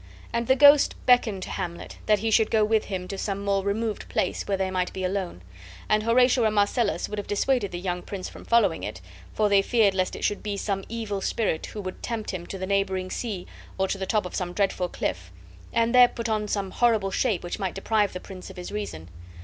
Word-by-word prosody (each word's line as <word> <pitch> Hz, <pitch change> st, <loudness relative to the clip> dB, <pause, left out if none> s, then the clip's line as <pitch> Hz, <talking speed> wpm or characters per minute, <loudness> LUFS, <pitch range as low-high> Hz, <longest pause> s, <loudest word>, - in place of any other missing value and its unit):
And 235 Hz, 0 st, -1 dB
the 260 Hz, -, +5 dB
ghost 285 Hz, +1 st, +7 dB
beckoned 225 Hz, -6 st, +3 dB
to -, -, -6 dB
Hamlet, 170 Hz, 0 st, -5 dB
that 210 Hz, -1 st, +5 dB
he 220 Hz, +2 st, -1 dB
should 220 Hz, 0 st, +4 dB
go 215 Hz, -1 st, +3 dB
with 220 Hz, 0 st, +2 dB
him 185 Hz, -2 st, -4 dB
to 195 Hz, 0 st, -5 dB
some 200 Hz, -1 st, -3 dB
more 195 Hz, -1 st, +1 dB
removed 210 Hz, +2 st, -2 dB
place -, -, -1 dB
where 200 Hz, -1 st, 0 dB
they 190 Hz, 0 st, -1 dB
might 180 Hz, -1 st, -1 dB
be 190 Hz, -, -4 dB
alone; 185 Hz, -, -3 dB, 0.4 s
and 215 Hz, 0 st, +3 dB
Horatio 245 Hz, +2 st, +4 dB
and 215 Hz, -1 st, +2 dB
Marcellus 205 Hz, +2 st, +1 dB
would 210 Hz, -, -4 dB
have 205 Hz, -, -6 dB
dissuaded 205 Hz, 0 st, +1 dB
the 175 Hz, -, -4 dB
young 180 Hz, -1 st, -2 dB
prince 190 Hz, -1 st, -6 dB
from -, -, -11 dB
following 210 Hz, -8 st, +3 dB
it, 105 Hz, -2 st, -5 dB, 0.3 s
for 215 Hz, -, +1 dB
they 200 Hz, -1 st, +5 dB
feared 210 Hz, -1 st, +3 dB
lest 185 Hz, -1 st, -1 dB
it -, -, -7 dB
should 205 Hz, -, 0 dB
be 205 Hz, -1 st, -3 dB
some 195 Hz, -1 st, -2 dB
evil 215 Hz, -3 st, -3 dB
spirit 195 Hz, -6 st, -1 dB
who 210 Hz, -, -6 dB
would 185 Hz, -1 st, -7 dB
tempt 230 Hz, -3 st, -3 dB
him 180 Hz, -3 st, -6 dB
to 195 Hz, -, -6 dB
the 185 Hz, -, -3 dB
neighboring 190 Hz, -1 st, 0 dB
sea 205 Hz, -7 st, -4 dB, 0.3 s
or 190 Hz, 0 st, +1 dB
to 195 Hz, -, -3 dB
the 190 Hz, -, -3 dB
top 215 Hz, -2 st, +1 dB
of 180 Hz, -, -7 dB
some 180 Hz, -2 st, -3 dB
dreadful 190 Hz, -2 st, 0 dB
cliff, 90 Hz, -, -4 dB, 0.4 s
and 230 Hz, +1 st, +1 dB
there 250 Hz, -1 st, +8 dB
put 235 Hz, -1 st, -5 dB
on 215 Hz, -1 st, 0 dB
some 200 Hz, -2 st, -2 dB
horrible 220 Hz, -5 st, +2 dB
shape 215 Hz, -3 st, 0 dB
which 175 Hz, -, -4 dB
might 190 Hz, -3 st, -2 dB
deprive 205 Hz, +1 st, +1 dB
the 180 Hz, -, -6 dB
prince 185 Hz, 0 st, -10 dB
of 190 Hz, -, -12 dB
his 180 Hz, -, -6 dB
reason. 85 Hz, -6 st, -5 dB
200 Hz, 235 wpm, -26 LUFS, 185-220 Hz, 0.4 s, there